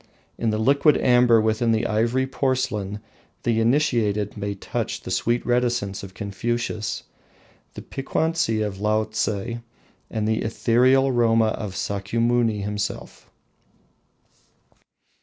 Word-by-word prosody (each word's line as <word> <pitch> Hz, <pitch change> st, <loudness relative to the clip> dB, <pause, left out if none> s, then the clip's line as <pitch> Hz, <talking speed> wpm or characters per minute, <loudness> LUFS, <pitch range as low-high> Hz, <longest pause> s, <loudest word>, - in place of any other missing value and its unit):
In 115 Hz, -, -1 dB
the 110 Hz, -, 0 dB
liquid 140 Hz, +6 st, +4 dB
amber 125 Hz, -2 st, +5 dB
within 110 Hz, +1 st, +1 dB
the 110 Hz, +1 st, 0 dB
ivory 115 Hz, +4 st, +1 dB
porcelain, 130 Hz, -7 st, -2 dB, 0.4 s
the 115 Hz, -2 st, +1 dB
initiated 115 Hz, -5 st, +1 dB
may 100 Hz, -1 st, -3 dB
touch 115 Hz, +3 st, -4 dB
the -, -, -7 dB
sweet 120 Hz, +6 st, 0 dB
reticence 120 Hz, -5 st, 0 dB
of 95 Hz, -1 st, -10 dB
Confucius, 110 Hz, +2 st, -3 dB, 0.7 s
the -, -, -8 dB
piquancy 135 Hz, -5 st, -1 dB
of 100 Hz, -2 st, -5 dB
Laotse, 110 Hz, +1 st, 0 dB, 0.8 s
and 110 Hz, -2 st, -2 dB
the 110 Hz, 0 st, +1 dB
ethereal 125 Hz, +4 st, +3 dB
aroma 115 Hz, -3 st, +3 dB
of 105 Hz, -4 st, -5 dB
Sakyamuni 110 Hz, +2 st, 0 dB
himself. 105 Hz, 0 st, -5 dB
115 Hz, 110 wpm, -23 LUFS, 105-120 Hz, 0.8 s, amber